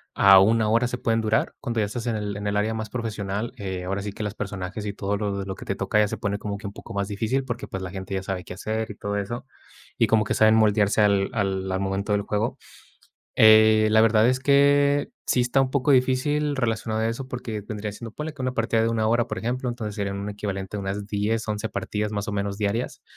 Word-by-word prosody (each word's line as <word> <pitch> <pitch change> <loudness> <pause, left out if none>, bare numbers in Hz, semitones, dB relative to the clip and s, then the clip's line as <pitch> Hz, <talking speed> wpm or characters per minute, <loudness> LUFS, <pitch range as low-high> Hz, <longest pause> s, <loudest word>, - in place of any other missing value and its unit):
a 100 -1 +8
1 110 +2 +3
hora, 115 +3 +3
se 125 - -4
pueden 115 -1 0
durar. 110 0 +1
Cuando 115 -1 -2
ya 105 - +2
estás 115 +4 -5
en 115 - 0
el 105 -1 -3
en 105 0 -4
el 105 0 0
área 105 +2 +1
más 110 -1 -4
profesional, 105 -2 -3
eh, 95 -4 -4
ahora 95 +2 -2
sí 100 +1 -4
que, 105 - -6
las 105 -1 -3
personajes, 100 +1 -5
y 100 - -3
todo 100 0 -2
lo 100 -2 -2
lo 95 - -4
que - - -11
te 95 - -2
toca 100 +3 +1
ya 105 - +4
se - - -4
pone 100 0 -2
como 100 -1 -4
que 105 - -12
un 100 - -5
poco - - -10
más 100 0 -1
difícil, 110 +6 -1
porque, 125 -1 -5
pues, 95 0 -5
la 90 - -5
gente 95 0 -5
ya 95 - -2
sabe 95 -2 -4
qué - - -8
hacer 110 +3 -3
y 105 - -7
todo 100 0 -3
eso. 120 +5 -4 0.5
Y 115 - +4
como 110 0 +3
que - - -2
saben 110 0 +5
moldearse 105 -1 +3
al 100 -2 +3
al 95 -3 -1
al 95 - -1
momento 100 +2 -2
del 100 0 +1
juego. 105 +3 -1 0.8
Eh, 110 0 +7
la 110 - +5
verdad 110 +1 +5
es 130 0 0
que 140 +2 +4 0.2
sí 125 - +2
está 125 +2 +1
un 135 -1 +2
poco 140 +1 +1
difícil, 140 +3 +2
relacionado 110 -3 -1
a 110 - +1
eso, 130 +3 -5
porque 120 -4 -5
vendría 105 -1 -4
siendo, 115 +2 -8
ponle 150 +6 -5
que 140 - -8
una 130 0 -1
partida 115 -1 +1
de 115 - +2
1 115 -1 +1
hora, 120 +1 +2
por - - -4
ejemplo, 125 +2 -2
entonces 115 -4 -4
serían 100 -1 -3
un 100 +1 -4
equivalente 100 -1 -4
a - - -3
unas 100 +1 -4
10, 105 +2 -1
11 105 -1 -2
partidas, 105 0 -3
más 105 +1 -3
o - - -3
menos, 100 -1 -2
diarias. 115 +4 -2
110 Hz, 255 wpm, -24 LUFS, 100-115 Hz, 0.8 s, a